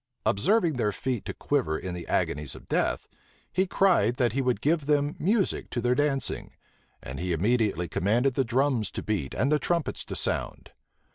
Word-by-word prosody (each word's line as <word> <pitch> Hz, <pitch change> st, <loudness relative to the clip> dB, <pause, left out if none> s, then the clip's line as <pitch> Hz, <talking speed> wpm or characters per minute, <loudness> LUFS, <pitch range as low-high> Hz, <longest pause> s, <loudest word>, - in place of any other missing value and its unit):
Observing 165 Hz, -, +2 dB
their 105 Hz, -4 st, +1 dB
feet 125 Hz, +2 st, -3 dB
to -, -, -3 dB
quiver 80 Hz, 0 st, 0 dB
in 90 Hz, -, -5 dB
the 85 Hz, -1 st, -7 dB
agonies 75 Hz, -3 st, -1 dB
of -, -, -13 dB
death, -, -, 0 dB, 0.5 s
he 190 Hz, +1 st, +2 dB
cried 175 Hz, -, +3 dB
that 120 Hz, -3 st, +1 dB
he 135 Hz, -, +1 dB
would 125 Hz, -2 st, +1 dB
give 155 Hz, -1 st, +1 dB
them 145 Hz, 0 st, +2 dB
music 200 Hz, +2 st, +1 dB
to 120 Hz, -, -2 dB
their 120 Hz, +1 st, +2 dB
dancing; 140 Hz, -1 st, -1 dB, 0.5 s
and 65 Hz, +2 st, -6 dB
he 90 Hz, +1 st, -2 dB
immediately 100 Hz, -1 st, +1 dB
commanded 115 Hz, -, +1 dB
the 135 Hz, -, +1 dB
drums 125 Hz, -2 st, +1 dB
to -, -, -6 dB
beat 100 Hz, -11 st, -2 dB
and 140 Hz, -, +1 dB
the 150 Hz, -, +3 dB
trumpets 170 Hz, +2 st, -1 dB
to -, -, -6 dB
sound. -, -, -2 dB
125 Hz, 185 wpm, -27 LUFS, 100-145 Hz, 0.5 s, cried